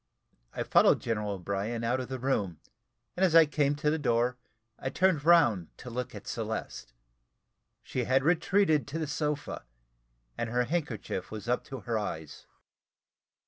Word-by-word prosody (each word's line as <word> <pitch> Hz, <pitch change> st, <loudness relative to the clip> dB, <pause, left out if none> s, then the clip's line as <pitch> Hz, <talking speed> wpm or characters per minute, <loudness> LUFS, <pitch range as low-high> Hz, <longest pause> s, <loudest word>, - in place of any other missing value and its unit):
I -, -, -3 dB
followed -, -, +5 dB
General 105 Hz, -3 st, -2 dB
O'Brien 100 Hz, +5 st, -3 dB
out 120 Hz, +3 st, +1 dB
of 130 Hz, -, -4 dB
the 130 Hz, -, -3 dB
room, 110 Hz, -, -1 dB, 0.6 s
and 185 Hz, -, 0 dB
as 175 Hz, -3 st, +4 dB
I 165 Hz, -1 st, +9 dB
came 145 Hz, -1 st, +1 dB
to 150 Hz, +1 st, +1 dB
the 160 Hz, -, 0 dB
door, 120 Hz, -2 st, +1 dB, 0.4 s
I 130 Hz, -, -2 dB
turned 165 Hz, 0 st, +2 dB
round 120 Hz, -, +5 dB
to 125 Hz, -, -9 dB
look 125 Hz, 0 st, -4 dB
at 105 Hz, -, -9 dB
Celeste. 110 Hz, -, -5 dB, 0.9 s
She 125 Hz, -2 st, -2 dB
had 130 Hz, +2 st, +3 dB
retreated 165 Hz, 0 st, +3 dB
to 145 Hz, +4 st, -4 dB
the 160 Hz, -, -1 dB
sofa, 150 Hz, -1 st, -3 dB, 0.8 s
and 115 Hz, -, -1 dB
her 125 Hz, +1 st, +1 dB
handkerchief 125 Hz, -, -3 dB
was 110 Hz, +1 st, -7 dB
up 125 Hz, +1 st, +1 dB
to 135 Hz, -3 st, -7 dB
her 115 Hz, +1 st, -1 dB
eyes. 80 Hz, -7 st, -6 dB
125 Hz, 160 wpm, -29 LUFS, 110-150 Hz, 0.9 s, I